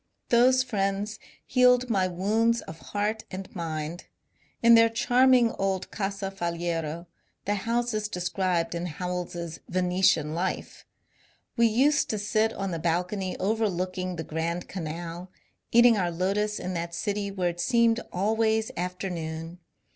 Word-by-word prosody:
Those 255 +2 +5
friends 205 -2 -2 0.3
healed 250 -1 +4
my 195 -5 +2
wounds 215 +6 +1
of 160 +1 -10
heart 210 +4 -2
and 190 +1 -8
mind. 165 0 -4 0.6
In 235 0 +8
their 230 0 +7
charming 245 0 +4
old 195 -1 -1
Casa 195 -1 -3
Faliero 170 -2 -3 0.2
— - - -45
the 205 - +1
house 235 +3 -1
is 215 -1 -1
described 180 -2 -1
in 170 +1 -3
Howells's 175 -1 -4
" - - -27
Venetian 180 -4 +2
Life 180 +3 -4 0.2
" - - -34
— - - -43
we 235 -1 +5
used 275 +7 +3
to 215 - -1
sit 215 +2 +1
on 195 -3 -4
the 165 - -3
balcony 180 +3 -1
overlooking 185 -3 -1
the 160 - -4
Grand 165 +3 -3
Canal, 170 +1 -6 0.4
eating 235 -1 +6
our 180 -3 +1
lotus 200 +5 -1
in 185 - -4
that 170 0 -4
city 205 +1 -2
where 185 -3 -1
it 175 0 -7
seemed 235 +1 +3
always 220 +3 +1
afternoon. 175 -2 -4
190 Hz, 145 wpm, -27 LUFS, 175-220 Hz, 0.6 s, In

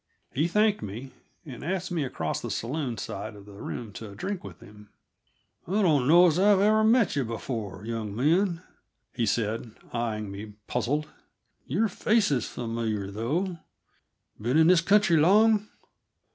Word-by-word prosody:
He 150 +6 +1
thanked 210 +3 +2
me, 115 +7 -7 0.3
and 130 -6 -9
asked 185 +2 -2
me 165 -4 0
across 80 - -3
to - - -5
the - - -4
saloon 125 -1 -3
side 105 +2 -6
of 100 -1 -13
the 100 -1 -12
room 110 -4 -6
to 105 -2 -9
drink 190 - -4
with - - -10
him. 105 0 -15 0.8
"I 200 +4 +1
don't 145 -8 +3
know 175 +4 +7
as 170 0 +3
I've 210 +2 +4
met 230 -6 +3
you 140 - +1
before, 110 -4 -5
young 110 -3 -4
man," 170 - +1 0.5
he 115 -3 -1
said, 110 +1 -1 0.2
eying 110 -3 -2
me 105 +2 -8
puzzled. 145 +6 -1 0.6
"Your 200 - +1
face 215 0 +1
is 125 -5 0
familiar, 115 -4 -3
though; 165 - -2 0.8
been 120 +7 +1
in 160 - +6
this 175 0 +6
country 195 -2 +4
long?" 210 +6 +4
135 Hz, 160 wpm, -27 LUFS, 110-185 Hz, 0.8 s, know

